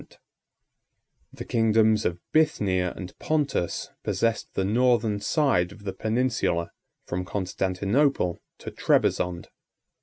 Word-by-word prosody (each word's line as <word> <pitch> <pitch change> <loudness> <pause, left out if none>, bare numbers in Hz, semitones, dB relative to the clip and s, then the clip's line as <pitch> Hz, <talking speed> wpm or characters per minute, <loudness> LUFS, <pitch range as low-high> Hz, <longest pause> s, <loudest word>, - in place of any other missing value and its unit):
The - - -8
kingdoms 110 -2 +3
of 85 - 0 0.2
Bithynia 100 - +2
and 90 -2 -8
Pontus 145 - -1
possessed 115 -1 -1
the 95 - 0
northern 115 -1 +2
side 100 - +1
of 100 0 -14
the 95 -2 -4
peninsula 110 -6 0 0.3
from 90 +1 -3
Constantinople 95 - 0 0.2
to - - -8
Trebizond. 90 -1 +1
105 Hz, 100 wpm, -26 LUFS, 90-120 Hz, 0.3 s, kingdoms